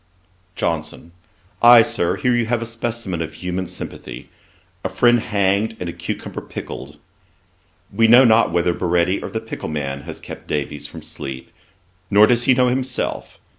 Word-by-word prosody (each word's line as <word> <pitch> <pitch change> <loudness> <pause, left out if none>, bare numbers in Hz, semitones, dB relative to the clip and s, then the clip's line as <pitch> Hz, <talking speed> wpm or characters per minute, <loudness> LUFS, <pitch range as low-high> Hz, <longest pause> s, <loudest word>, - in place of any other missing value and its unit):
JOHNSON. 80 +1 -3 0.5
'Ay, 120 -1 +9
Sir, 85 -5 -1
here 125 -1 +1
you 120 -2 +1
have 120 0 +1
a 115 - -4
specimen 115 -6 -4
of 80 - -5
human 90 0 -4
sympathy; - - -8 0.5
a - - -1
friend 120 0 +4
hanged, 105 0 0
and 90 - -4
a 85 - -4
cucumber 85 0 -6
pickled. - - -8 1.0
We 115 +3 +4
know 125 +3 +8
not 115 -4 +4
whether 85 +1 +1
Baretti 90 +2 +1
or - - -5
the - - -3
pickle - - -7
man 70 -3 -3
has 80 - -7
kept - - -10
Davies 75 0 -3
from 80 +1 -11
sleep; 70 -4 -8 0.6
nor 105 +1 +7
does 120 +1 +2
he 130 - +5
know 125 0 +3
himself. 130 0 -3
100 Hz, 165 wpm, -20 LUFS, 85-120 Hz, 1.0 s, Ay